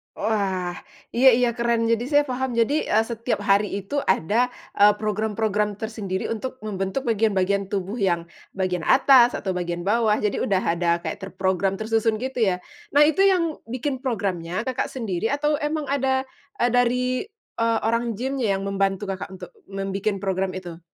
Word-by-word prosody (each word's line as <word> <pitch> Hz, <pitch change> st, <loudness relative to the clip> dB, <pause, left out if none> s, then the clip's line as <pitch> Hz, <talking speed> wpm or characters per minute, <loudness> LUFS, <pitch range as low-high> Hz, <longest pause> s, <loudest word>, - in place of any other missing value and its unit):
Wah, 190 Hz, -4 st, -1 dB, 0.3 s
iya 255 Hz, +3 st, +4 dB
iya, 245 Hz, -1 st, +2 dB
keren. 235 Hz, -1 st, +1 dB
Jadi, 230 Hz, +1 st, +1 dB
saya 290 Hz, 0 st, +4 dB
paham, 255 Hz, -1 st, -2 dB
jadi, 270 Hz, +7 st, +1 dB
eee, 220 Hz, +1 st, +3 dB
setiap 230 Hz, -2 st, -3 dB
hari 200 Hz, +1 st, +3 dB, 0.2 s
itu 285 Hz, +8 st, -2 dB
ada, 225 Hz, +9 st, +2 dB, 0.3 s
eee, 205 Hz, 0 st, +7 dB
program-program 210 Hz, -1 st, -1 dB
tersendiri 210 Hz, -4 st, -4 dB
untuk 255 Hz, +4 st, -4 dB
membentuk 195 Hz, +4 st, -3 dB
bagian-bagian 200 Hz, -3 st, +1 dB
tubuh 200 Hz, +3 st, -3 dB
yang 175 Hz, -4 st, +1 dB, 0.3 s
bagian 185 Hz, -2 st, -1 dB
atas, 260 Hz, -2 st, +6 dB
atau 190 Hz, -, -2 dB
bagian 175 Hz, -1 st, -3 dB
bawah. 215 Hz, +1 st, +2 dB
Jadi, 210 Hz, -2 st, -1 dB
udah 195 Hz, -2 st, +1 dB
ada 170 Hz, 0 st, +1 dB
kayak 160 Hz, +4 st, -4 dB
terprogram, 190 Hz, 0 st, -1 dB
tersusun, 220 Hz, +1 st, 0 dB
gitu 255 Hz, +2 st, -4 dB
ya? 180 Hz, -1 st, -1 dB, 0.3 s
Nah, 290 Hz, -, +8 dB
itu 310 Hz, +4 st, +2 dB
yang 335 Hz, -5 st, +1 dB
bikin 255 Hz, +2 st, -3 dB
programnya 195 Hz, -6 st, -2 dB
Kakak 255 Hz, -1 st, -2 dB
sendiri? 225 Hz, -5 st, -2 dB
Atau, 295 Hz, +2 st, 0 dB
emang 300 Hz, +1 st, -1 dB
ada 265 Hz, -1 st, +1 dB, 0.5 s
dari, 250 Hz, -, +1 dB, 0.3 s
eee, 230 Hz, -1 st, +2 dB
orang 230 Hz, 0 st, 0 dB
gym 265 Hz, +4 st, -3 dB
yang 195 Hz, -4 st, 0 dB
membantu 195 Hz, 0 st, 0 dB
Kakak, 190 Hz, -, -5 dB
untuk 180 Hz, -1 st, -10 dB, 0.2 s
membikin 195 Hz, +1 st, -3 dB
program 190 Hz, -1 st, -1 dB
itu? 175 Hz, -3 st, -7 dB
215 Hz, 160 wpm, -24 LUFS, 195-245 Hz, 0.5 s, Nah